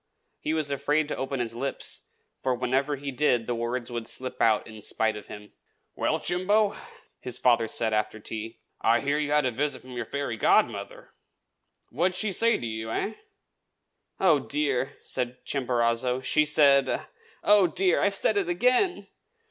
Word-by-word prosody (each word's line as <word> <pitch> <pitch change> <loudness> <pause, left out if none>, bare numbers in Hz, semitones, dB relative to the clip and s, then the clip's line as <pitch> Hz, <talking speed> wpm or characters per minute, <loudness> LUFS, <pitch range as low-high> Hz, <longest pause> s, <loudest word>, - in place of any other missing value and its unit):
he 155 - -2
was 155 -3 0
afraid 145 +2 +1
to - - -3
open 135 0 -3
his 115 -2 -3
lips, 135 +3 -3 0.3
for 130 -1 0
whenever 130 +4 0
he 140 0 -5
did 125 -4 +1
the 120 - -2
words 120 +1 -3
would 120 -1 -4
slip 130 +1 -4
out 110 -2 +3
in 110 -1 -11
spite 110 +1 +1
of 105 - -9
him. 105 0 -11 0.4
"Well, - - 0
Chimbo," 200 +4 +2
said - - -12 0.3
his 125 -1 -6
father 115 -3 +3 0.2
after 110 0 -1
tea, 110 +2 -6 0.2
"I 115 +1 +3
hear 145 +2 0
you 150 -1 -1
have 150 -2 +3
had 125 - 0
a - - -16
visit 145 +3 -1
from 130 - -12
your 125 - -4
fairy 140 -5 -3
godmother. - - +1 0.8
What 175 +8 +1
did - - -5
she 215 0 -1
say 230 +5 +3
to - - -6
you, 110 0 -4
eh?" 205 - -2 1.1
"Oh, 165 -6 +4
dear!" 140 -1 -1
said 125 -1 -3
Chimborazo, 125 -1 0
"she 150 +3 +3
said 145 -1 +4 0.4
oh, 205 -2 +5
dear! 180 +2 +2
I've 200 0 +2
said 205 +1 +2
it 190 -3 0
again!" 250 - +2
135 Hz, 175 wpm, -27 LUFS, 120-155 Hz, 1.1 s, oh